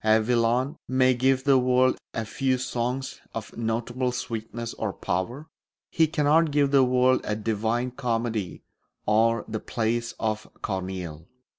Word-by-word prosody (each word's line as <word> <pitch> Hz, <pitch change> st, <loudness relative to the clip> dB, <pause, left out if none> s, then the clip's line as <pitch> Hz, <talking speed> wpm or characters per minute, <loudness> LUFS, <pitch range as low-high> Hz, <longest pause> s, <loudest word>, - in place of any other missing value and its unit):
A 110 Hz, 0 st, +5 dB
Villon 120 Hz, +5 st, +1 dB
may 130 Hz, 0 st, +4 dB
give 130 Hz, +1 st, +2 dB
the 135 Hz, -1 st, +5 dB
world 130 Hz, 0 st, +3 dB
a 115 Hz, -, -3 dB
few 130 Hz, +3 st, 0 dB
songs 125 Hz, +1 st, -3 dB
of 110 Hz, -2 st, -6 dB
notable 120 Hz, +2 st, -1 dB
sweetness 115 Hz, -1 st, -5 dB
or 105 Hz, -3 st, -3 dB
power; 120 Hz, -, -3 dB, 0.4 s
he 160 Hz, -1 st, +3 dB
cannot 155 Hz, +1 st, +3 dB
give 145 Hz, -1 st, +2 dB
the 135 Hz, -2 st, +6 dB
world 130 Hz, 0 st, +3 dB
a 105 Hz, -, -1 dB
Divine 110 Hz, +3 st, -1 dB
Comedy 115 Hz, -6 st, -2 dB, 0.4 s
or 115 Hz, +2 st, +3 dB
the 110 Hz, 0 st, -3 dB
plays 115 Hz, +1 st, -2 dB
of 110 Hz, -1 st, -2 dB
Corneille. 90 Hz, -5 st, -4 dB
120 Hz, 140 wpm, -26 LUFS, 110-130 Hz, 0.4 s, the